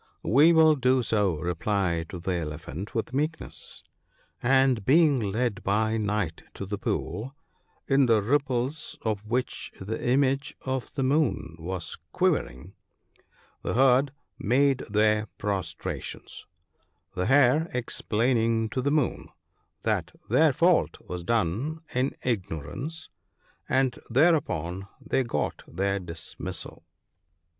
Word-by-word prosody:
' - - -45
We 145 +9 +6
will 160 -2 +6
do 130 -1 +2
so/ 105 -6 +1
replied 85 +1 -1
the 90 +1 -4
Elephant 80 +2 -5
with 115 +2 -2
meekness; 155 +4 -4 0.6
and 130 -3 +3
being 145 - +5
led 110 +1 -1
by 110 +3 +1
night 105 -6 -1
to 100 - -5
the 100 +1 -4
pool, 130 +7 -3 0.5
in 135 -1 +4
the 110 -3 +4
ripples 135 +3 -1
of 105 -2 -1
which 125 +3 -2
the 110 +4 -4
image 135 +2 +1
of 130 -1 -3
the 135 - -1
Moon 135 - +1
was 90 +1 -4
quivering, - - 0 0.9
the - - -2
herd 130 +2 +4 0.3
made 135 +4 +3
their 105 +1 +2
prostrations; 100 -2 -4 0.7
the 90 0 -1
Hare 145 +4 +4
explaining 115 -2 0
to 130 - -2
the 140 - +1
Moon 150 -3 0 0.5
that - - -1
their - - +5
fault - - +3
was 90 -1 -7
done 115 - 0
in 130 +2 0
ignorance, 120 - -4 0.6
and 130 -1 +1
thereupon 115 - +2
they 135 -1 0
got 120 - -2
their 100 +3 -1
dismissal." 85 -3 -7
115 Hz, 115 wpm, -27 LUFS, 100-135 Hz, 0.9 s, We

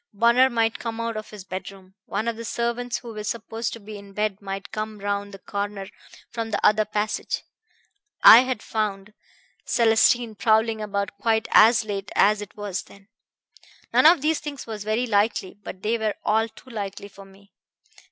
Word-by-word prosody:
Bunner 235 +4 +5
might 225 -2 0
come 230 -1 -5
out 230 -1 -2
of 215 0 -6
his 210 -3 -10
bedroom. 190 0 -8
One 220 - -2
of 235 - -1
the 230 - -7
servants 235 +1 -2
who 235 -2 -9
were 210 -1 -6
supposed 225 0 -4
to 230 - -8
be 210 0 -9
in 200 -1 -14
bed 210 -1 -2
might 195 0 -6
come 215 0 -4
round 200 0 -3
the 195 - -9
corner 200 0 -5 0.4
from 230 -1 -4
the 215 - -1
other 215 0 +4
passage 210 0 -2 0.8
I 225 - +11
had 255 -3 -1
found 210 -2 -3 0.5
Célestine 225 -1 +2
prowling 220 0 +2
about 200 -1 -3
quite 220 +1 +1
as 225 +1 +6
late 200 -2 -5
as 210 +1 +4
it 205 - -10
was 205 -3 -3
then. 200 +1 -18 0.8
None - - +7
of 335 -3 +6
these 315 0 +2
things 290 -2 -7
was 215 -3 -6
very 215 +4 0
likely; 205 -3 0
but 185 - -9
they 230 +2 0
were 215 -1 -1
all 220 +2 +1
too 260 +4 -16
likely 200 -2 -5
for 200 0 -14
me. 195 +1 -20
215 Hz, 180 wpm, -24 LUFS, 200-230 Hz, 0.8 s, I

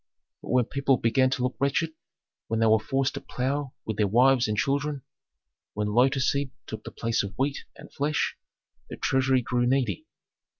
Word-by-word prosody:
But - - -11
when 125 0 +3
people 140 0 +1
began 130 +3 +2
to 130 -1 -1
look 125 0 -1
wretched, 140 +4 +1 0.6
when 115 - -1
they 115 - +3
were 110 0 +5
forced 135 +5 0
to - - -5
plough 135 +2 -3
with 110 -2 -3
their 105 - +2
wives 125 +3 +4
and 105 0 -2
children, 140 +2 -1 0.7
when 105 0 -1
lotus 130 +3 +3
seed 140 -1 -1 0.2
took 110 -1 -7
the - - -7
place 115 0 -1
of 100 0 -7
wheat 140 +2 -1
and - - -14
flesh, 150 +2 0 0.5
the - - -7
treasury 130 -1 +2
grew 120 0 0
needy. 125 -8 0
130 Hz, 180 wpm, -26 LUFS, 115-135 Hz, 0.7 s, were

